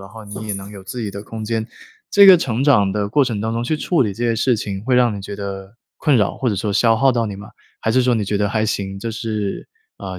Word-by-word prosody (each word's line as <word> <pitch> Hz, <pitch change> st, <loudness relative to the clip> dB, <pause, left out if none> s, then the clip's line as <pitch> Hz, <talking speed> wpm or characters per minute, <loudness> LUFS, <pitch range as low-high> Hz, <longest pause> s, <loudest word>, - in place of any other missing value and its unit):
然 95 Hz, -, -11 dB
后 110 Hz, 0 st, -11 dB
你 105 Hz, +1 st, -8 dB
也 -, -, -1 dB
能 100 Hz, 0 st, -7 dB
有 100 Hz, -2 st, -10 dB
自 120 Hz, +6 st, -6 dB
己 110 Hz, -, -3 dB
的 100 Hz, 0 st, -7 dB
空 110 Hz, +1 st, -7 dB
间， 110 Hz, 0 st, -2 dB, 0.4 s
这 200 Hz, -1 st, +7 dB
个 190 Hz, -2 st, +10 dB
成 130 Hz, -4 st, -1 dB
长 115 Hz, -9 st, +4 dB
的 100 Hz, +1 st, -2 dB
过 140 Hz, +6 st, +3 dB
程 115 Hz, -5 st, -3 dB
当 110 Hz, +1 st, -2 dB
中 115 Hz, +1 st, -2 dB
去 155 Hz, +6 st, -1 dB
处 150 Hz, +2 st, +1 dB
理 105 Hz, -5 st, -2 dB
这 120 Hz, +5 st, -4 dB
些 115 Hz, -, +1 dB
事 120 Hz, +2 st, +2 dB
情， 100 Hz, -2 st, -5 dB
会 125 Hz, 0 st, +2 dB
让 120 Hz, -4 st, +3 dB
你 100 Hz, -, -7 dB
觉 100 Hz, +1 st, -7 dB
得 100 Hz, +1 st, -7 dB, 0.2 s
困 150 Hz, -4 st, +3 dB
扰 105 Hz, -4 st, +1 dB
或 130 Hz, -, -1 dB
者 105 Hz, -, -1 dB
说 105 Hz, +2 st, -2 dB
消 115 Hz, +2 st, +3 dB
耗 135 Hz, +2 st, +3 dB
到 115 Hz, -1 st, 0 dB
你 100 Hz, -2 st, -6 dB
吗？ 100 Hz, -, -10 dB, 0.3 s
还 110 Hz, -, -1 dB
是 130 Hz, +2 st, +3 dB
说 125 Hz, 0 st, +2 dB
你 110 Hz, -3 st, 0 dB
觉 100 Hz, +1 st, -1 dB
得 100 Hz, 0 st, +1 dB
还 110 Hz, +1 st, 0 dB
行， 95 Hz, -2 st, -3 dB
这 115 Hz, -, -4 dB
是， 110 Hz, -3 st, -4 dB, 0.3 s
呃， 95 Hz, -1 st, -6 dB
110 Hz, 310 characters per minute, -20 LUFS, 100-120 Hz, 0.4 s, 个